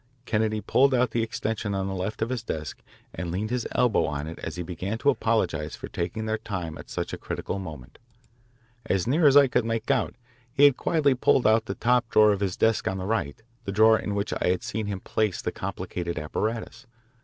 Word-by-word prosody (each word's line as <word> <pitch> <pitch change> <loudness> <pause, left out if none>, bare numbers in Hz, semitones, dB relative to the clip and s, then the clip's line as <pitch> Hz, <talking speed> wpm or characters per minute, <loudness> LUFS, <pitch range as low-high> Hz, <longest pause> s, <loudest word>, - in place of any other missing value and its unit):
Kennedy 110 -2 0
pulled 130 +6 +3
out 125 0 +2
the 120 - 0
extension 110 -2 -2
on 95 -1 -1
the 95 - -3
left 95 +4 -3
of 115 - -3
his 130 -2 -2
desk 80 -9 -5 0.3
and 90 - -4
leaned 100 +6 -3
his 125 -1 -1
elbow 120 -4 +3
on 75 -2 -3
it 80 +1 -8
as - - -5
he 90 - -4
began 95 +5 -4
to 140 +4 +3
apologise 90 - -1
for - - -8
taking 95 +6 -3
up - - -4
their 110 0 0
time 90 -6 -5
at - - -11
such - - -4
a - - -5
critical 100 - -4
moment. 75 -9 -9 0.9
As 95 -2 +1
near 150 +5 +4
as 140 0 +7
I 145 - +8
could 125 - +1
make 115 0 -1
out, - - 0 0.4
he 140 +2 +2
had 145 -3 +7
quietly 150 -4 +2
pulled 125 0 +2
out 110 +1 +4
the 95 - -4
top 125 0 +2
drawer 105 -1 +6
of 100 - 0
his 95 -3 -2
desk 110 -1 +2
on 95 - -1
the 95 - -4
right, 110 -3 -2 0.2
the 100 - -2
drawer 110 +2 +5
in 105 - -3
which 100 0 -1
I - - -1
had 90 0 +1
seen 110 0 -3
him 100 -2 -4
place 105 -4 -1
the - - -2
complicated 85 -1 -4
apparatus. 110 +11 -3
110 Hz, 225 wpm, -26 LUFS, 95-115 Hz, 0.9 s, I